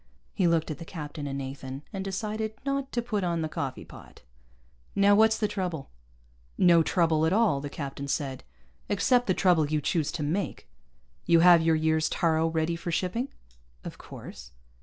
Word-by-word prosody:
He 185 -4 +2
looked 165 -1 +1
at 155 - -6
the - - -6
captain 150 -3 -7
and 140 0 -4
Nathan, 135 0 -6
and 195 -1 -3
decided 215 +3 -3
not 275 -1 -2
to 240 - -1
put 215 -5 -2
on 170 -2 -1
the - - -1
coffee 135 -4 -5
pot. - - -14 0.7
"Now 200 +1 +5
what's 220 +1 +5
the 215 - 0
trouble?" 180 -8 -4 0.7
"No 170 -2 +6
trouble 160 -2 +2
at 165 - +1
all," 205 -10 +2
the 145 - -5
captain 140 -1 -6
said, 135 -2 -3 0.5
"except 245 +5 +2
the 185 - +2
trouble 175 -5 +3
you 155 0 +1
choose 150 0 0
to 165 -3 -3
make. 170 +6 -3 0.6
You 170 -1 +5
have 175 -1 +7
your 160 0 +3
year's 160 0 +1
taaro 160 -1 +1
ready 165 +1 0
for 170 +1 -5
shipping?" 185 +10 -1 0.6
"Of - - -8
course." 65 +2 -11
165 Hz, 180 wpm, -27 LUFS, 155-200 Hz, 0.7 s, have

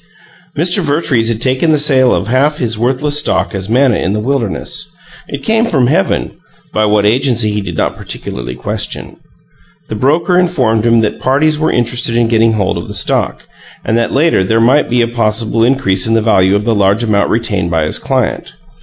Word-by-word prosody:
Mr. 175 +5 +2
Vertrees 145 -7 0
had 115 -2 -2
taken 130 +5 +1
the 155 - +3
sale 135 -4 +4
of 90 +3 -1
half 135 +5 +2
of - - -13
his 120 -3 -1
worthless 130 +6 0
stock - - -1
as 95 0 -4
manna 125 -1 +2
in 95 - -2
the 105 - -2
wilderness; 120 -2 -2 0.4
it 140 0 -7
came 225 +6 +1
from 135 - +1
heaven 120 - -1 0.4
by 110 - +1
what 105 -1 +1
agency 120 -1 +1
he 105 0 -2
did 100 - -7
not - - -1
particularly 60 - -6
question. 60 - -5 0.7
The - - -4
broker 160 - +1
informed 125 -11 0
him 115 -1 +3
that 110 - -2
"parties 150 +4 +1
were 155 - 0
interested 120 -1 -1
in 120 -1 +1
getting 115 0 +2
hold 100 -3 -1
of - - -8
the - - -5
stock," - - 0 0.4
and 110 - 0
that 115 - -1
later 145 - +2
there 110 +4 +1
might 125 +6 +2
be 120 0 +2
a - - 0
possible 115 -1 -1
increase 115 -7 +1
in 115 - +1
the - - +3
value 95 -3 +3
of 105 +1 -1
the 115 - +1
large 100 +2 +1
amount 105 -3 +1
retained 105 -6 -1
by 80 -2 0
his 75 - -1
client. - - -2
115 Hz, 200 wpm, -13 LUFS, 105-135 Hz, 0.7 s, sale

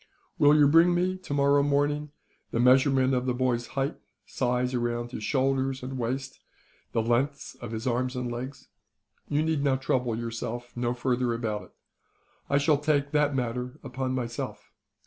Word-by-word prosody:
Will 145 +1 +6
you 145 -1 +6
bring 165 +4 +5
me, 180 +1 +1
tomorrow 145 -5 +2
morning, 145 +1 +1 0.4
the 115 - -2
measurement 130 +1 +4
of 125 0 0
the 125 - +1
boy's 125 -2 0
height, 135 +3 0 0.3
size 125 0 -1
around 120 -1 -2
his 110 - -6
shoulders 135 +1 0
and 130 0 -5
waist, 130 +3 -3 0.5
the 115 - +1
lengths 130 +5 0
of 120 -2 -6
his 110 0 -4
arms 125 +1 0
and 125 -1 -3
legs? 130 +3 -7 0.6
You 150 +1 +1
need 160 -3 0 0.2
trouble 125 -4 0
yourself 115 +1 -5
no 120 0 -1
further 125 -1 0
about 110 -3 -3
it. - - -22 0.8
I 140 - +3
shall 145 0 +3
take 145 -1 +1
that 150 -2 +2
matter 125 +2 -3
upon 130 -1 -3
myself. 120 -2 -5
130 Hz, 160 wpm, -27 LUFS, 120-140 Hz, 0.8 s, Will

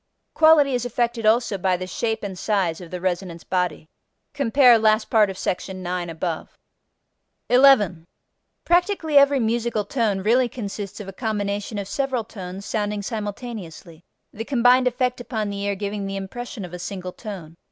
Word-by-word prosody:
Quality 315 -4 +5
is 245 -1 0
affected 235 -2 -1
also 220 -3 +2
by 185 0 +1
the 185 - -5
shape 220 +5 -2
and 195 -2 -4
size 185 -4 -1
of 175 - -10
the 180 - -5
resonance 175 -1 -3
body. 180 -4 -2 0.5
(Cf. 250 -3 +5
last 215 0 +2
part 215 -3 +5
of 190 - -6
sec. 180 - -1
9 180 -2 -4
above.) 165 0 -5 0.9
11. 215 -11 +5 0.6
Practically 345 -4 +3
every 280 0 +4
musical 230 -2 0
tone 210 -4 0
really 240 +4 +3
consists 205 -4 -6
of 205 - -8
a 195 - -7
combination 205 -1 -3
of 200 -1 -4
several 260 +1 -1
tones 195 -2 -8
sounding 210 -1 -2
simultaneously, 205 -6 -6 0.3
the 220 - -5
combined 250 0 +4
effect 250 0 0
upon 220 -4 -3
the 200 0 -5
ear 200 0 -1
giving 200 0 -4
the 195 - -4
impression 205 +2 -6
of 180 - -11
a 180 - -6
single 185 0 -6
tone. 185 -8 -8
210 Hz, 165 wpm, -23 LUFS, 185-240 Hz, 0.9 s, Quality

